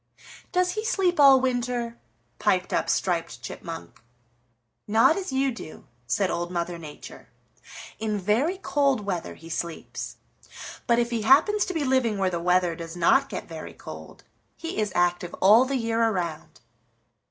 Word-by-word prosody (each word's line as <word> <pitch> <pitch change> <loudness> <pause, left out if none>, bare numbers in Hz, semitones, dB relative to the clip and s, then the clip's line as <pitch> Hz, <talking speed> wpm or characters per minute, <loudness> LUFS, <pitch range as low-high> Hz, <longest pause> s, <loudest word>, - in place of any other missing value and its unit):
"Does 360 0 +2
he 430 +2 -3
sleep 375 -7 +1
all 275 -2 +8
winter?" 245 -2 -1 0.4
piped 185 -1 +1
up - - 0
Striped 170 -3 -1
Chipmunk. 165 -7 -8 0.9
"Not 225 +9 +5
as 380 -6 -4
you 265 0 +1
do," 225 -9 -10 0.2
said 180 +12 +1
Old 175 0 -2
Mother 170 -1 -3
Nature. 150 -3 -11 0.7
"In 215 -1 -1
very 225 - +1
cold 280 - +1
weather 190 -4 -4
he 165 - -13
sleeps, 165 0 -5 0.7
but 235 - +4
if 240 0 +1
he 230 -2 -1
happens 315 - +4
to 370 - -3
be 315 - 0
living 255 -5 +1
where 190 -1 +1
the 170 - -2
weather 180 0 +2
does 165 0 -8
not 220 +11 +4
get - - -6
very - - -8
cold, - - -11 0.3
he 330 -8 -5
is 210 -2 0
active 175 0 +1
all 215 +6 +6
the 270 0 -1
year 230 -1 0
around. 180 -8 -2
220 Hz, 155 wpm, -26 LUFS, 175-270 Hz, 0.9 s, all